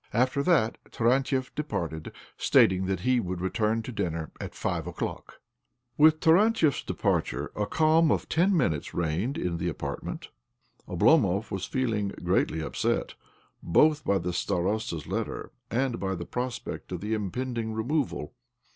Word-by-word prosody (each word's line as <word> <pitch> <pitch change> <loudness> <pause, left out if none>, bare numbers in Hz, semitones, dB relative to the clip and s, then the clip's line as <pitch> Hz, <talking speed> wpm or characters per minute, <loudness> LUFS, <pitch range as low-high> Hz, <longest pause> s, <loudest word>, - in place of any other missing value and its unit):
After 130 +5 +2
that 140 -9 +2
Tarantiev 130 +2 +1
departed, 85 - -4 0.2
stating 95 0 +4
that 95 -2 -1
he 125 +3 +3
would 90 -4 -3
return 110 +4 0
to 125 - -6
dinner 85 -7 -3
at - - -6
five - - -2
o'clock. - - -5 0.6
With 155 +2 +6
Tarantiev's 165 - +4
departure - - -1
a 105 -1 -1
calm 160 +5 +4
of - - 0
ten 180 +4 +3
minutes 80 - 0
reigned 85 - -1
in 85 -2 -2
the 85 +1 -1
apartment. 80 - -5 0.6
Oblomov 100 +5 +3
was 95 -2 -2
feeling 115 -6 -1 0.2
greatly 80 - +1
upset, - - -1 0.5
both 150 - +3
by 100 - +2
the 90 -1 -3
starosta's 90 -2 -1
letter - - -4 0.2
and 125 0 0
by 95 0 -1
the 85 -1 -6
prospect 125 +3 -5
of - - -4
the 105 +2 -2
impending 115 +2 -2
removal. 125 +7 -2
110 Hz, 140 wpm, -28 LUFS, 90-135 Hz, 0.6 s, With